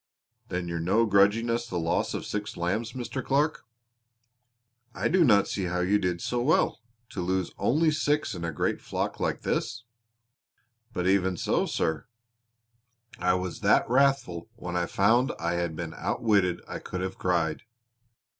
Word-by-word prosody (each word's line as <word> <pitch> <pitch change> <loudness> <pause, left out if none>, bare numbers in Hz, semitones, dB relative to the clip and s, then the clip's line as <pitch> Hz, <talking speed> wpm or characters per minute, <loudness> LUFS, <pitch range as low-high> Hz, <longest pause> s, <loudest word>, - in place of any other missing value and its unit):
"Then 90 -1 -3
you're 85 -1 -3
no 95 +8 +2
grudging 100 +3 +4
us 120 0 -1
the 90 - -3
loss 85 0 0
of - - -4
six 105 0 -4
lambs, 100 +7 -1
Mr. 130 +1 -4
Clark." 145 -1 0 1.3
"I - - 0
do 185 -1 +4
not 105 -8 +5
see 95 - -2
how 90 0 -1
you 100 +3 +2
did 90 -2 -1
so 120 -1 -1
well 145 +1 +2 0.3
to 90 - -4
lose 95 0 -1
only 155 +5 +3
six 150 -4 0
in 85 -2 -6
a 85 - -2
great 75 - -1
flock - - -3
like - - -1
this!" 115 +1 -2 1.1
"But 90 -6 -2
even 95 -1 +2
so, - - +1
sir, 80 +8 -1 1.1
I 90 0 +2
was 90 -1 -4
that - - +3
wrathful 125 -8 +1
when 90 -6 -6
I 85 -1 0
found 115 +6 +3
I 85 +1 -1
had 85 -2 -2
been 85 -1 -5
outwitted 100 -6 +1
I - - -5
could 90 - -5
have 95 0 -4
cried. 85 -4 0
95 Hz, 165 wpm, -27 LUFS, 90-120 Hz, 1.3 s, not